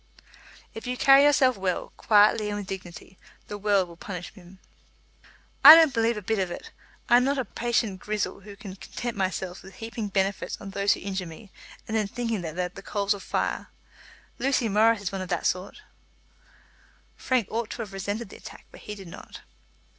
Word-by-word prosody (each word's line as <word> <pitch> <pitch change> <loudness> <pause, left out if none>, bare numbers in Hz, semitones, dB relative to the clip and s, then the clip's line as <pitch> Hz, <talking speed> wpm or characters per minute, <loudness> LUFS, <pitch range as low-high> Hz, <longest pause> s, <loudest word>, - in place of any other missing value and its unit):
"If 225 +2 -8
you 250 0 -2
carry 275 +1 +7
yourself 265 -5 +4
well, 190 -2 -3
quietly 210 0 +4
and 205 - -3
with 205 - -5
dignity, 185 -1 -9 0.3
the 205 - -6
world 200 -2 +2
will 170 - -13
punish 180 0 -7
him." 185 -1 -16 1.1
"I 300 +3 +13
don't 320 -4 +5
believe 230 -1 +1
a 210 - -6
bit 220 +2 -1
of 185 -2 -1
it. - - -8 0.4
I 240 - +6
am 250 - +3
not 280 +2 +1
a 260 - -1
Patient 230 -3 -1
Grizel 210 0 -3
who 200 +1 -12
can 200 -2 -9
content 240 +4 -6
myself 190 -2 -3
with 190 0 -14
heaping 225 -1 -5
benefits 195 0 -1
on 195 - -8
those 200 +1 +2
who - - -8
injure 190 -2 -4
me, 185 +5 -12 0.4
and 220 - -3
then 215 -2 +1
thinking 230 -2 -3
that 160 -2 -6
they 180 - -1
are - - -5
coals 200 0 0
of 200 - -8
fire. - - -2 0.7
Lucy 265 -3 +1
Morris 220 +1 +3
is 190 - -2
one 195 -1 -4
of 185 - -6
that 175 - -2
sort." 185 - -2 1.3
Frank 255 -5 0
ought 225 -1 -2
to 235 - -5
have 200 -3 -11
resented 205 +3 -4
the - - -11
attack, - - -12
but - - -13
he 210 - -7
did 195 -3 -11
not. 170 - -11
205 Hz, 200 wpm, -26 LUFS, 190-230 Hz, 1.3 s, I